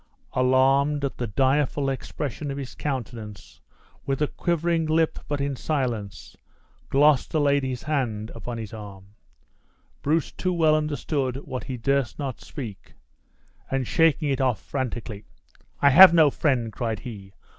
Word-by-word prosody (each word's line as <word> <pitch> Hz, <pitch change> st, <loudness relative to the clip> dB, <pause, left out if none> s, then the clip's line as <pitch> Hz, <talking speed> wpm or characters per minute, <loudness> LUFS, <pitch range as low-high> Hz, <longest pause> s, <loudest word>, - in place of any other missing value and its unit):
Alarmed 135 Hz, +3 st, +3 dB
at 135 Hz, -, -4 dB
the 120 Hz, -, -2 dB
direful 135 Hz, +5 st, +1 dB
expression 140 Hz, +1 st, -4 dB
of 140 Hz, -, -4 dB
his 135 Hz, -2 st, -6 dB
countenance, 115 Hz, -7 st, -6 dB, 0.4 s
with 135 Hz, -1 st, -2 dB
a 150 Hz, -, +3 dB
quivering 170 Hz, 0 st, -1 dB
lip, 160 Hz, +1 st, +1 dB
but 145 Hz, -1 st, -2 dB
in 140 Hz, 0 st, -1 dB
silence, 120 Hz, -, -3 dB, 0.5 s
Gloucester 145 Hz, +2 st, +3 dB
laid 140 Hz, -1 st, +3 dB
his 130 Hz, -2 st, -4 dB
hand 120 Hz, -8 st, -2 dB
upon 120 Hz, -1 st, -6 dB
his 110 Hz, -2 st, -7 dB
arm. 100 Hz, -2 st, -10 dB, 0.9 s
Bruce 155 Hz, +1 st, 0 dB
too 185 Hz, 0 st, -2 dB
well 160 Hz, -3 st, +4 dB
understood 145 Hz, -3 st, -1 dB
what 130 Hz, -, -5 dB
he 130 Hz, -, -5 dB
durst 135 Hz, -2 st, 0 dB
not 135 Hz, -3 st, -5 dB
speak, 115 Hz, -9 st, -9 dB, 0.7 s
and, 135 Hz, -1 st, -1 dB
shaking 160 Hz, +2 st, +2 dB
it 135 Hz, -, 0 dB
off, 130 Hz, -4 st, +1 dB
frantically: 120 Hz, -5 st, -5 dB, 0.6 s
"I 140 Hz, -, +7 dB
have 180 Hz, +4 st, +10 dB
no 155 Hz, -4 st, +6 dB
friend!" 125 Hz, -8 st, 0 dB
cried 110 Hz, -4 st, -3 dB
he. 100 Hz, -5 st, -9 dB
135 Hz, 145 wpm, -25 LUFS, 120-150 Hz, 0.9 s, have